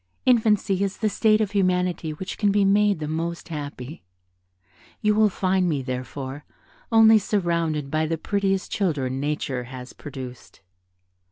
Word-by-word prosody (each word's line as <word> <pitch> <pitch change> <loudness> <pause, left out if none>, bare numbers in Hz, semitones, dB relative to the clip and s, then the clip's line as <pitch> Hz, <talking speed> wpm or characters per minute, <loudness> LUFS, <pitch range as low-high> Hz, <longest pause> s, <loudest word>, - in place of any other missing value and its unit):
Infancy 215 -5 +3
is 195 0 -2
the 215 - 0
state 215 +1 +3
of 210 -2 -1
humanity 180 -4 0
which 185 +5 -7
can 205 -2 +3
be 200 0 +3
made 205 0 +3
the 155 -1 -4
most 170 +3 -4
happy; 145 -2 -7 1.0
you 210 -1 +2
will 215 0 +4
find 185 -1 +1
me, 145 -4 -1
therefore, 130 +2 -5 0.5
only 225 -1 +7
surrounded 170 -8 -1
by 155 0 +1
the 165 +1 -1
prettiest 195 +1 -1
children 140 -9 -1
nature 140 -3 -2
has 125 0 -9
produced." 130 -4 -10
175 Hz, 145 wpm, -24 LUFS, 145-200 Hz, 1.0 s, only